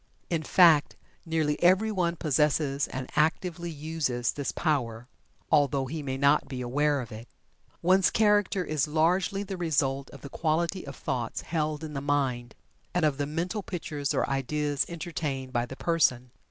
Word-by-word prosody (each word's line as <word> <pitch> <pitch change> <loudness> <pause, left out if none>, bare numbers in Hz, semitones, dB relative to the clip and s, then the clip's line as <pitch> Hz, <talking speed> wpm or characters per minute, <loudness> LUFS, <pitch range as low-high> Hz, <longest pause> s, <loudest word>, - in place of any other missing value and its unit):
In 165 -2 +1
fact, 160 -2 +5 0.3
nearly 155 -2 0
everyone 185 -1 +3
possesses 150 -2 +1
and 130 0 -5
actively 170 +2 0
uses 150 -6 -2
this 140 -2 -3
power, 125 -7 -1 0.4
although 140 -2 +3
he 155 +4 -5
may 135 -2 -3
not 140 +2 +3
be 130 -2 -6
aware 145 +3 +1
of 120 - -9
it. 110 +2 -9 0.6
One's 185 +2 +5
character 205 -3 +2
is 155 -3 0
largely 180 +6 +1
the 195 -1 -6
result 140 -5 0
of 140 - -13
the 140 - -8
quality 170 +3 -1
of 140 - -7
thoughts 120 -3 -3
held 155 -2 -2
in 155 -1 -6
the 135 - -3
mind, 130 -5 -1 0.4
and 180 -3 +3
of 145 -2 0
the 145 - 0
mental 175 +7 -2
pictures 150 -7 -4
or - - +1
ideals 145 +1 -1
entertained 150 -6 -4
by 120 0 0
the 130 - -8
person. 125 -7 +1
150 Hz, 160 wpm, -28 LUFS, 135-170 Hz, 0.6 s, fact